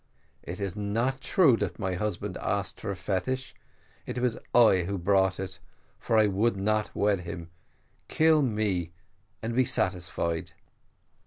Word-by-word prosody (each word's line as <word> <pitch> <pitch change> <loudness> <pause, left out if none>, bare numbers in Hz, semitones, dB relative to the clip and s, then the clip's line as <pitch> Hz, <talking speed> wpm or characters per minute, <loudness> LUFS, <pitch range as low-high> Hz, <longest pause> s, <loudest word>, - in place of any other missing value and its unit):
It 90 +3 -7
is 100 -2 -3
not 115 +6 -1
true 155 -7 +4
that - - -3
my 95 -4 -2
husband 100 0 -3
asked 100 -1 -2
for 110 - -4
a 100 - -2
fetish 105 +8 -2 0.5
it - - -4
was 125 -2 +1 0.2
I 110 -7 +5
who 100 0 -2
bought 95 +1 +2
it, 95 -1 -5 0.4
for 115 - +1
I 110 - +6
would 105 +2 +1
not 105 +2 0
wed 100 -2 +2
him. 85 -1 -7 0.6
Kill 160 -1 +4
me 105 - 0 0.5
and 115 +1 -2
be 130 - +5
satisfied.' 85 -6 -2
100 Hz, 150 wpm, -28 LUFS, 95-115 Hz, 0.6 s, I